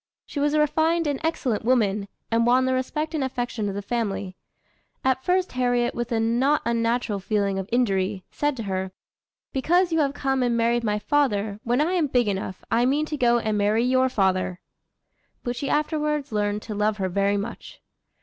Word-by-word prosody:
She 290 Hz, -, -5 dB
was 290 Hz, +1 st, +1 dB
a -, -, +3 dB
refined 320 Hz, +3 st, +2 dB
and 285 Hz, -2 st, -1 dB
excellent 265 Hz, -9 st, -1 dB
woman, 210 Hz, -5 st, +1 dB, 0.2 s
and 230 Hz, +1 st, +3 dB
won 255 Hz, +2 st, +4 dB
the 260 Hz, -, +1 dB
respect 300 Hz, +5 st, -2 dB
and 305 Hz, -4 st, 0 dB
affection 245 Hz, -5 st, -2 dB
of 195 Hz, -, -5 dB
the 200 Hz, -, -4 dB
family. 200 Hz, -4 st, -2 dB, 0.7 s
At 260 Hz, 0 st, +1 dB
first 365 Hz, +2 st, +1 dB
Harriet, 245 Hz, -1 st, +1 dB
with 240 Hz, +1 st, -4 dB
a 230 Hz, -, +1 dB
not 245 Hz, +6 st, +2 dB
unnatural 230 Hz, -2 st, 0 dB
feeling 200 Hz, -1 st, 0 dB
of 190 Hz, -, -6 dB
injury, 195 Hz, -5 st, +1 dB
said 290 Hz, -2 st, -1 dB
to 230 Hz, -, -4 dB
her: 190 Hz, -1 st, -3 dB, 0.6 s
"Because 345 Hz, +6 st, +2 dB
you 325 Hz, -, +2 dB
have 280 Hz, -2 st, +1 dB
come 270 Hz, -2 st, 0 dB
and 240 Hz, -1 st, +1 dB
married 235 Hz, +1 st, +2 dB
my 210 Hz, -2 st, 0 dB
father, 210 Hz, -5 st, 0 dB
when 245 Hz, +2 st, +1 dB
I 335 Hz, +4 st, +1 dB
am 340 Hz, -5 st, +2 dB
big 245 Hz, -4 st, +2 dB
enough, 190 Hz, -2 st, -3 dB
I 230 Hz, +1 st, +3 dB
mean 285 Hz, +5 st, +2 dB
to 310 Hz, -, -4 dB
go 240 Hz, -4 st, +3 dB
and 215 Hz, -2 st, -1 dB
marry 210 Hz, +3 st, +2 dB
your 260 Hz, +1 st, +3 dB
father;" 185 Hz, -5 st, 0 dB, 0.8 s
but 245 Hz, 0 st, -2 dB
she 270 Hz, +2 st, -3 dB
afterwards 300 Hz, -1 st, 0 dB
learned 210 Hz, 0 st, -1 dB
to 220 Hz, -, -6 dB
love 210 Hz, +1 st, 0 dB
her 190 Hz, -2 st, -1 dB
very 200 Hz, +2 st, +1 dB
much. 210 Hz, +4 st, -7 dB
240 Hz, 195 wpm, -24 LUFS, 210-275 Hz, 0.8 s, won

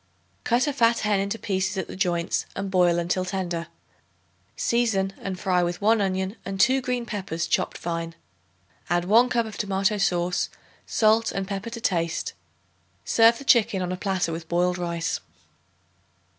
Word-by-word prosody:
Cut 240 Hz, +1 st, +2 dB
a 290 Hz, -, -1 dB
fat 235 Hz, -3 st, +3 dB
hen 210 Hz, -2 st, +2 dB
into 200 Hz, +3 st, -2 dB
pieces 190 Hz, -2 st, -1 dB
at 190 Hz, -, -1 dB
the -, -, -8 dB
joints 175 Hz, -2 st, 0 dB
and 195 Hz, 0 st, -4 dB
boil 175 Hz, -2 st, +4 dB
until 175 Hz, +2 st, 0 dB
tender; 180 Hz, -3 st, -3 dB, 0.9 s
season 215 Hz, -5 st, +1 dB
and 190 Hz, -2 st, -4 dB
fry 180 Hz, -2 st, +2 dB
with 175 Hz, 0 st, -1 dB
1 220 Hz, +1 st, +3 dB
onion 190 Hz, +2 st, -1 dB
and 195 Hz, 0 st, -5 dB
2 265 Hz, +4 st, +4 dB
green 250 Hz, -1 st, -2 dB
peppers 190 Hz, -7 st, -3 dB
chopped -, -, 0 dB
fine. 165 Hz, -1 st, -4 dB, 0.7 s
Add 175 Hz, 0 st, +1 dB
1 230 Hz, +6 st, +5 dB
cup 235 Hz, -2 st, +1 dB
of 220 Hz, -, -8 dB
tomato 195 Hz, +1 st, 0 dB
sauce, 175 Hz, -2 st, +1 dB, 0.4 s
salt 220 Hz, +1 st, +3 dB
and 195 Hz, -1 st, -3 dB
pepper 200 Hz, +3 st, -4 dB
to 230 Hz, 0 st, -7 dB
taste. 170 Hz, -6 st, -1 dB, 0.7 s
Serve 230 Hz, +1 st, +5 dB
the -, -, -9 dB
chicken 210 Hz, -7 st, +4 dB
on 180 Hz, -, -3 dB
a -, -, -1 dB
platter 185 Hz, -2 st, -1 dB
with 165 Hz, 0 st, -6 dB
boiled 180 Hz, +1 st, +1 dB
rice. 170 Hz, -1 st, -2 dB
190 Hz, 165 wpm, -25 LUFS, 175-220 Hz, 0.9 s, 1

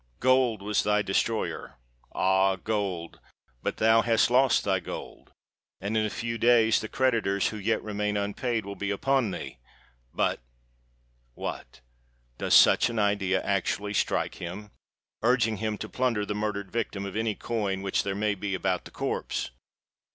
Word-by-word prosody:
gold 125 Hz, -5 st, +3 dB
was 105 Hz, +1 st, +1 dB
thy 105 Hz, 0 st, +2 dB
destroyer! 110 Hz, +3 st, -1 dB, 0.4 s
Ah! 95 Hz, +1 st, +3 dB
gold—but 95 Hz, -, -5 dB
thou 110 Hz, +1 st, +5 dB
hast 115 Hz, 0 st, +2 dB
lost 130 Hz, 0 st, +4 dB
thy 95 Hz, -2 st, +1 dB
gold,—and 100 Hz, +3 st, -9 dB
in 110 Hz, -, +2 dB
a 105 Hz, -, 0 dB
few 115 Hz, +2 st, -4 dB
days 115 Hz, -2 st, +4 dB
the 110 Hz, -, -4 dB
creditors 115 Hz, -7 st, +1 dB
who 110 Hz, -, -6 dB
yet 110 Hz, +2 st, 0 dB
remain 105 Hz, -1 st, -2 dB
unpaid, 105 Hz, +2 st, -2 dB
will 100 Hz, -, -5 dB
be 100 Hz, 0 st, -3 dB
upon 130 Hz, +3 st, +1 dB
thee! 90 Hz, -8 st, -7 dB, 0.5 s
But—— -, -, 0 dB, 1.0 s
What!—does -, -, -5 dB
such -, -, +6 dB
an 115 Hz, -, -4 dB
idea 100 Hz, -2 st, +1 dB
actually 100 Hz, +1 st, -1 dB
strike -, -, -1 dB
him?—urging 110 Hz, +4 st, -2 dB
him 110 Hz, +1 st, -2 dB
to 110 Hz, -, -6 dB
plunder 115 Hz, -4 st, 0 dB
the 105 Hz, -, -3 dB
murdered 105 Hz, -2 st, -3 dB
victim 100 Hz, -4 st, -3 dB
of 100 Hz, -, -6 dB
any 110 Hz, -1 st, 0 dB
coin 100 Hz, -5 st, -2 dB
which 95 Hz, -, +1 dB
there 100 Hz, -1 st, -3 dB
may 105 Hz, 0 st, +1 dB
be 100 Hz, 0 st, -3 dB
about -, -, -1 dB
the -, -, -11 dB
corpse! -, -, -3 dB
105 Hz, 145 wpm, -27 LUFS, 100-115 Hz, 1.0 s, such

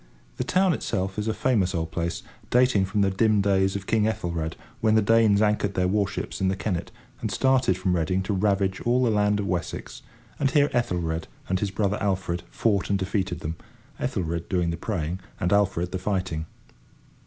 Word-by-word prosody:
The -, -, -1 dB
town 185 Hz, -1 st, +3 dB
itself 95 Hz, -7 st, -2 dB
is 105 Hz, -, -2 dB
a 110 Hz, -, +1 dB
famous 100 Hz, -8 st, +1 dB
old 80 Hz, -1 st, -2 dB
place, 85 Hz, 0 st, -3 dB, 0.3 s
dating 125 Hz, -6 st, +4 dB
from 100 Hz, +2 st, 0 dB
the 100 Hz, -1 st, +3 dB
dim 105 Hz, +2 st, +3 dB
days 95 Hz, -1 st, +2 dB
of 100 Hz, 0 st, -4 dB
King 110 Hz, 0 st, +2 dB
Ethelred, 85 Hz, -7 st, -2 dB, 0.2 s
when 110 Hz, -3 st, +3 dB
the 110 Hz, -, +5 dB
Danes 110 Hz, -1 st, +4 dB
anchored 105 Hz, -2 st, +1 dB
their 90 Hz, 0 st, +2 dB
warships 100 Hz, 0 st, -1 dB
in 95 Hz, -, +2 dB
the 95 Hz, -, +1 dB
Kennet, 95 Hz, -3 st, -3 dB, 0.3 s
and -, -, -2 dB
started 130 Hz, -8 st, +2 dB
from 90 Hz, -1 st, 0 dB
Reading 90 Hz, +3 st, 0 dB
to 100 Hz, -, -1 dB
ravage 95 Hz, -1 st, +1 dB
all 125 Hz, +2 st, +2 dB
the 120 Hz, -, +3 dB
land 105 Hz, 0 st, +2 dB
of 100 Hz, -, -1 dB
Wessex; 90 Hz, -2 st, -4 dB, 0.4 s
and 140 Hz, -, +2 dB
here 145 Hz, 0 st, +3 dB
Ethelred 85 Hz, -9 st, -1 dB, 0.2 s
and 95 Hz, 0 st, 0 dB
his 100 Hz, -, -1 dB
brother 100 Hz, +1 st, 0 dB
Alfred 95 Hz, -3 st, -1 dB
fought 100 Hz, -4 st, 0 dB
and 100 Hz, -, +2 dB
defeated 95 Hz, 0 st, -2 dB
them, 80 Hz, +2 st, -4 dB, 0.4 s
Ethelred 85 Hz, -1 st, -2 dB
doing 90 Hz, -3 st, +1 dB
the -, -, -2 dB
praying 90 Hz, -2 st, -3 dB, 0.2 s
and 90 Hz, +3 st, +1 dB
Alfred 95 Hz, -4 st, +1 dB
the 95 Hz, -, -3 dB
fighting. 90 Hz, -5 st, -2 dB
95 Hz, 190 wpm, -25 LUFS, 90-105 Hz, 0.4 s, the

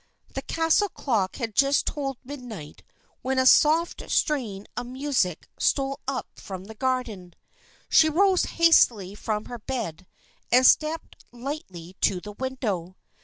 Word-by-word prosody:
The -, -, -3 dB
castle 330 Hz, +5 st, +1 dB
clock 220 Hz, -, -1 dB
had 230 Hz, -4 st, -4 dB
just 275 Hz, +5 st, +3 dB
tolled 275 Hz, -3 st, -3 dB
midnight 245 Hz, -, -9 dB, 0.4 s
when 265 Hz, +1 st, -1 dB
a 260 Hz, -, +3 dB
soft 315 Hz, +5 st, +4 dB
strain 225 Hz, -10 st, 0 dB
of 245 Hz, -, -4 dB
music 255 Hz, -, -1 dB
stole 275 Hz, 0 st, +1 dB
up 270 Hz, -2 st, -2 dB
from 190 Hz, -2 st, -8 dB
the 220 Hz, -, -10 dB
garden. 220 Hz, -7 st, -3 dB, 0.5 s
She 315 Hz, 0 st, +5 dB
rose 375 Hz, +3 st, +3 dB
hastily 235 Hz, -, +4 dB
from 210 Hz, 0 st, -3 dB
her 240 Hz, -, -7 dB
bed 200 Hz, -8 st, -5 dB, 0.4 s
and 255 Hz, +1 st, +6 dB
stepped 315 Hz, +4 st, +2 dB
lightly 235 Hz, -, -7 dB
to 185 Hz, -, +2 dB
the 210 Hz, +3 st, -9 dB
window. 205 Hz, -8 st, -4 dB
250 Hz, 135 wpm, -25 LUFS, 200-285 Hz, 0.5 s, and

